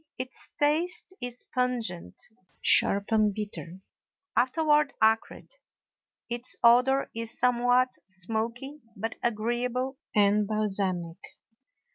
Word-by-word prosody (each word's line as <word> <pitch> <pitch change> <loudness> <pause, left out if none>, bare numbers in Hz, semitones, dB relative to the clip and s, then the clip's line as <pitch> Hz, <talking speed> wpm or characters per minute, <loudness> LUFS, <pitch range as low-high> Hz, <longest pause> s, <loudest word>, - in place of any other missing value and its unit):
Its 255 0 -5
taste 325 +6 0
is 245 0 -6
pungent, 235 - -2 0.4
sharp, 200 +2 +3
and 215 -2 +3
bitter, 190 -4 -6 0.5
afterward 295 +3 +2
acrid; 220 - +1 0.7
its 240 +1 -4
odor 250 +3 +4
is 230 0 -1
somewhat 250 +1 +3
smoky, 230 +9 -4
but 225 +3 -4
agreeable 240 +4 -1 0.2
and 205 0 +3
balsamic. 195 -5 -1
235 Hz, 90 wpm, -28 LUFS, 210-255 Hz, 0.7 s, odor